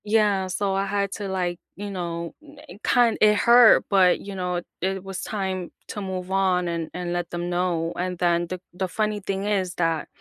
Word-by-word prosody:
Yeah, 205 -3 +2
so 195 +1 -1
I 195 +1 0
had 200 0 -1
to, 205 -2 -4
like, 180 -2 -2 0.2
you 205 +1 -6
know, 170 -2 -4
ne 295 -6 -14
kind 240 -2 +3
it 210 0 +6
hurt, 235 +2 +6
but 190 -3 +4
you 200 0 -8
know, 180 -1 -2 0.2
it 190 +1 -1
was 195 -1 -6
time 190 -4 -3 0.2
to 205 - -5
move 185 -1 -5
on 185 -2 +2
and 170 -1 -3
and 175 -1 -3
let 175 -1 -2
them 175 0 -3
know. 175 -2 0
And 180 0 -3
then 175 0 +1
the 185 +1 -5
the 185 +1 -2
funny 210 +2 -1
thing 195 0 -3
is 190 -3 0
that 165 -2 0
190 Hz, 200 wpm, -24 LUFS, 175-200 Hz, 0.2 s, it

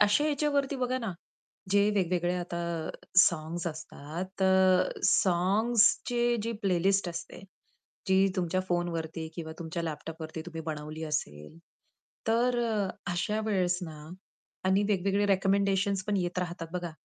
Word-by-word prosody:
अशा 210 +8 +4
ह्याच्यावरती 285 -2 +1
बघा 255 0 0
ना, 225 -6 -3 0.6
जे 205 +1 +4
वेगवेगळे 180 -2 +1
आता 175 -1 -4 0.6
साँग्स 170 0 +3
असतात, 165 +4 -6
अ, 190 -1 +4
साँग्सची 225 +6 +3
जी 230 +2 -2
प्लेलिस्ट 195 0 +2
असते 170 - -7 0.7
जी 190 +1 +5
तुमच्या 185 0 0
फोनवरती 165 -2 -2
किंवा 160 -2 -6
तुमच्या 170 0 -4
लॅपटॉपवरती 160 0 -5
तुम्ही 165 -2 -6
बनवली 155 0 -5
असेल. 150 - -4 0.7
तर 240 +2 +2
अ, 215 -4 0 0.2
अशा 210 +5 -1
वेळेस 180 -4 +1
ना 155 -3 -8 0.6
आणि 190 +2 +3
वेगवेगळे 200 0 +1
रेकमेंडेशन्स 195 0 +2
पण 210 0 0
येत 180 -1 -1
राहतात 175 -2 -3
बघा, 175 -1 -3
185 Hz, 125 wpm, -29 LUFS, 170-205 Hz, 0.7 s, जी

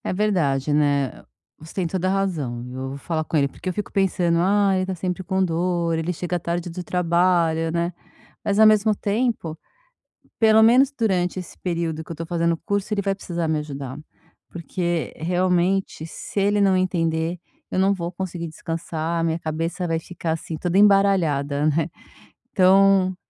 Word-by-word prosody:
É - - -2
verdade, 155 -9 +1
né. 145 -2 +1 0.4
Você 160 +1 -13
tem 185 - 0
toda 185 +2 -1
razão. 160 -12 -2
Eu 130 +1 -5
vou 135 - -6
falar 155 +3 -2
com 155 - -1
ele. 140 -1 +3
Porque 185 - -6
eu - - -2
fico 210 - -4
pensando: 180 -3 +1
"Ah, 200 +2 +3
ele 185 - +1
está 185 0 -3
sempre 180 +1 -3
com 190 +1 0
dor. 170 0 0
Ele 165 +2 -1
chega 175 +1 -3
tarde 170 +1 -3
do 180 +2 -6
trabalho", 170 -2 +1
né. 170 +1 -1 0.5
Mas 200 - 0
ao 220 - +7
mesmo 215 0 +5
tempo, 205 -7 -1 0.8
pelo 220 -1 +6
menos 250 +5 +5
durante 190 -8 0
esse 180 - -10
período 165 -3 -2
que 160 - -11
eu - - -2
estou 165 +1 -6
fazendo 170 -1 +1
o - - -3
curso, 205 +1 -1
ele 200 - 0
vai 195 0 -1
precisar 170 -3 -3
me 155 -1 +1
ajudar. 140 -3 -6 0.5
Porque, 170 -3 -3
realmente, 180 0 0
se 165 - -5
ele 205 +1 +2
não 195 -1 +4
entender, 170 -2 0 0.3
eu - - 0
não 195 +1 +4
vou 170 -2 -4
conseguir 175 -2 -5
descansar, 165 +1 -3
a - - 0
minha 165 0 0
cabeça 165 +3 -3
vai 165 -1 0
ficar 170 0 -5
assim, 160 0 -5
toda 175 +3 -1
embaralhada, 175 -9 +3
né. 155 +2 +1 0.6
Então 190 0 +4
175 Hz, 180 wpm, -23 LUFS, 160-190 Hz, 0.8 s, ao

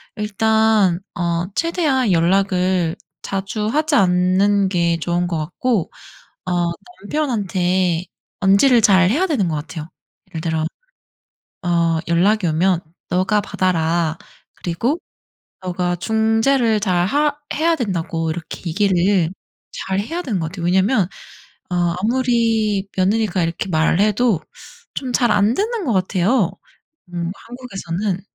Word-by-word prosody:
일단 215 -3 +2 0.2
어 170 0 -1
최대한 295 - +1
연락을 180 0 +2 0.3
자주 195 +2 -3
하지 300 +5 +1
않는 190 0 +3
게 170 -2 +1
좋은 175 +2 -1
것 170 -2 -2
같고 180 +6 -1 0.5
어 185 - -3 0.5
남편한테 185 - 0 0.4
언질을 215 +6 +5
잘 190 -3 +5
해야 315 - +2
되는 245 - +1
것 155 - -1
같아요. 155 +1 -6 0.4
예를 165 -4 -6
들어 160 -1 -1 1.0
어 170 -2 +1
"연락이 180 +3 +2
오면 170 +3 +2 0.3
너가 185 +4 +2
받아라. 170 -4 0 0.4
그리고 230 - -1 0.7
너가 180 -1 -1
중재를 225 +4 +2
잘 180 -3 +1
하 290 +6 +1 0.2
해야 330 +2 +2
된다."고 170 - -2
이렇게 160 0 -6
얘기를 185 -1 +2 0.4
잘 190 0 -3
해야 330 - -4
되는 225 - -2
것 160 - -2
같아요. 175 0 -7
왜냐면 190 +2 +2 0.6
어 180 - -2 0.3
아무리 225 -3 +1
며느리가 195 -1 +1
이렇게 165 +3 -3
말을 160 +2 +2
해도 215 -2 +2 0.5
좀 255 -2 -4
잘 240 -1 +2
안 205 +3 +3
듣는 435 - -1
것 240 - +1
같아요 190 +2 +1 0.6
음 170 0 -3
한국에서는. 200 -6 -4
190 Hz, 245 characters per minute, -20 LUFS, 175-225 Hz, 1.0 s, 언질을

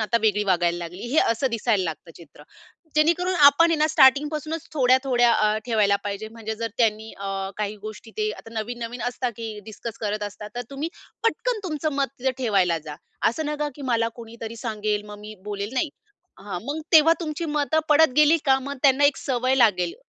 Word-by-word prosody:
आता 225 +2 +1
वेगळी 210 -1 +2
वागायला 175 -3 +1
लागली, 175 +2 -7
हे 315 - +3
असं 230 +4 0
दिसायला 225 -4 +1
लागतं 165 0 -6
चित्र. 150 -3 -15 0.5
जेणेकरून 345 +4 +2
आपण 300 +1 +6
हे 330 - +2
ना 305 0 +3
स्टार्टिंग 285 0 +5
पासूनच 310 +1 -4
थोड्या 260 -3 +4
थोड्या 245 -2 +3
अ, 215 -1 +2
ठेवायला 210 -4 +3
पाहिजे 205 +2 -4
म्हणजे 220 -1 -6
जर 230 +1 -3
त्यांनी 220 -1 +1
अ, 195 -1 -4
काही 210 0 -3
गोष्टी 215 +1 -9
ते 215 0 0
आता 225 - -13
नवीन-नवीन 235 +2 -5
असतात, 245 0 -3
की 225 -2 -6
डिस्कस 225 +2 -8
करत 210 -1 -2
असतात 205 0 -7
तर 245 - -3
तुम्ही 280 +4 -3 0.3
पटकन 460 +1 0
तुमचं 310 -3 -2
मत 275 0 +1
तिथे 265 +1 +1
ठेवायला 195 -9 +2
जा; 150 -2 -7 0.3
असं 305 +7 -3
नका, 300 0 -2
की 290 - -10
मला 230 -3 +1
कोणीतरी 230 -1 -9
सांगेल 215 -3 -2
मग 210 0 -10
मी 210 +1 -9
बोलेल, 205 +1 -4
नाही. 285 +5 +1 0.5
हां, 195 -2 -6
मग 290 +4 -3
तेव्हा 320 +1 +7
तुमची 315 0 -4
मतं 300 +1 +1
पडत 305 -2 +5
गेली 300 +2 +6
का 265 -2 +4
मग 280 +2 -6
त्यांना 280 0 +5
एक 285 - +4
सवय 255 0 0
लागेल, 185 -9 +3
230 Hz, 195 wpm, -24 LUFS, 210-285 Hz, 0.5 s, तेव्हा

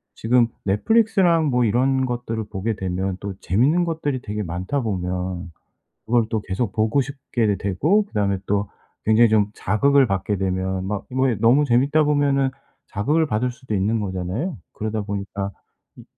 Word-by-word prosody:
지금 120 +1 +3 0.2
넷플릭스랑 180 - +3
뭐 125 -2 +2
이런 130 +4 +2
것들을 115 -3 -3
보게 105 +3 -2
되면 95 0 -2
또 100 -1 -4
재미있는 145 - +2
것들이 145 -6 -2
되게 105 0 -4
많다 90 +11 -2
보면 90 -3 -3 0.6
그걸 120 0 +3
또 110 - 0
계속 100 +2 -3
보고 110 +5 +2
싶게도 125 -6 -1
되고 155 - +2
그다음에 100 - 0
또 100 0 0 0.4
굉장히 110 +2 +5
좀 105 -1 +2
자극을 135 +7 +3
받게 95 +1 -1
되면 95 0 -1
막 105 0 -3
그 130 - -11
뭐 130 0 +2
에 115 - 0
너무 125 +6 +5
재미있다 140 +5 +3
보면은 140 -2 +2 0.4
자극을 150 +11 +1
받을 125 +1 0
수도 130 -4 -6
있는 105 +4 +1
거잖아요. 95 - -3 0.2
그러다 110 0 -3
보니까 100 0 -4 0.5
음 - - -11
으 - - -17
110 Hz, 345 characters per minute, -22 LUFS, 100-135 Hz, 0.6 s, 굉장히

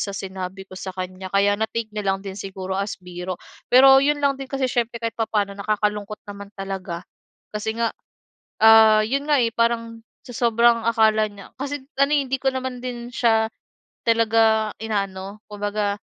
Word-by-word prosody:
sa 200 - -2
sinabi 190 0 -6
ko - - -18
sa 190 - -5
kanya, 185 0 -5
kaya 200 +1 +3
na-take 220 0 -2
niya 210 -2 -3
lang 195 - -2
din 195 -1 -6
siguro 190 -1 -6
as 200 +1 -2
biro. 180 0 -6 0.3
Pero, 270 +2 +8
'yon 290 +1 +2
lang 280 -1 +3
din, 270 - -5
kasi 270 -1 -1
siyempre, 240 -1 -1
kahit 230 -2 -2
papa'no, 210 -3 0
nakakalungkot 210 0 -2
naman 200 0 -8
talaga, 190 -3 -5 0.5
kasi 220 +1 -2
nga, 230 -1 +1 0.7
ah, 220 -1 +8
'yon 275 +5 -1
nga, 290 -2 +4
eh, 230 - 0
parang 230 -1 0 0.3
sa - - -10
sobrang 235 0 +3
akala 220 -1 +3
niya 200 -1 -13
kasi 285 0 -4 0.2
ano, 275 +2 +3
eh, 290 - +4
hindi 265 +1 -1
ko 270 - -8
naman 260 -1 -4
din 240 -1 -6
siya 225 -2 +2 0.6
talaga 225 -1 +3
inaano. 200 -1 -3
Kumbaga, 205 0 -2
220 Hz, 170 wpm, -23 LUFS, 200-235 Hz, 0.7 s, Pero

